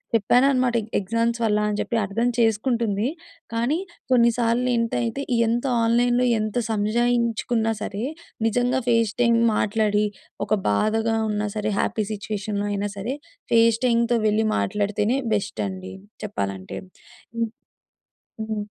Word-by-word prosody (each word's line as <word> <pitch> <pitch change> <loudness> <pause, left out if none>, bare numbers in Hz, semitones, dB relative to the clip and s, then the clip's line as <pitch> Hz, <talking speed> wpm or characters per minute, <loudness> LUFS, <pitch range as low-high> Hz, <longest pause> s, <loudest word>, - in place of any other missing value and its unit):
చెప్పాను 235 +4 +4
అనమాట. 255 -2 +1 0.2
ఎగ్జామ్స్ 230 +4 0
వల్ల 210 -2 +2
అని 205 - -2
చెప్పి 235 - -3
అర్థం 210 +5 0
చేసుకుంటుంది. 225 -1 +1 0.5
కానీ, 240 +7 +1 0.3
కొన్నిసార్లు 235 0 +3
ఇంత 230 0 -1
అయితే 235 +4 -2 0.3
ఎంత 235 +3 0 0.2
ఆన్‌లైన్‌లో 240 +2 +3
ఎంత 215 -1 -3 0.2
సంజాయించుకున్నా 230 +1 +1
సరే 210 0 -4 0.4
నిజంగా 245 +3 +1
ఫేస్ 230 -3 +2
టైం 235 -1 +4 0.2
మాట్లాడి 210 0 +1 0.4
ఒక - - +1 0.2
బాధగా 220 - +1
ఉన్నా 210 0 -1
సరే, 215 0 -1
హ్యాపీ 215 - 0
సిట్యుయేషన్‌లో 205 -1 -3
అయినా 205 0 -1
సరే, 225 +7 -3 0.4
ఫేస్ 230 -1 +5
టైంతో 235 0 +2
వెళ్లి 215 +1 +2
మాట్లాడితేనే 205 - 0 0.2
బెస్ట్ 205 0 -3
అండి 190 0 -7 0.3
చెప్పాలంటే. 100 - -4 0.6
హ్మ్. 230 -1 0 1.0
హ్మ్. 215 -1 -3
225 Hz, 120 wpm, -23 LUFS, 210-235 Hz, 1.0 s, ఫేస్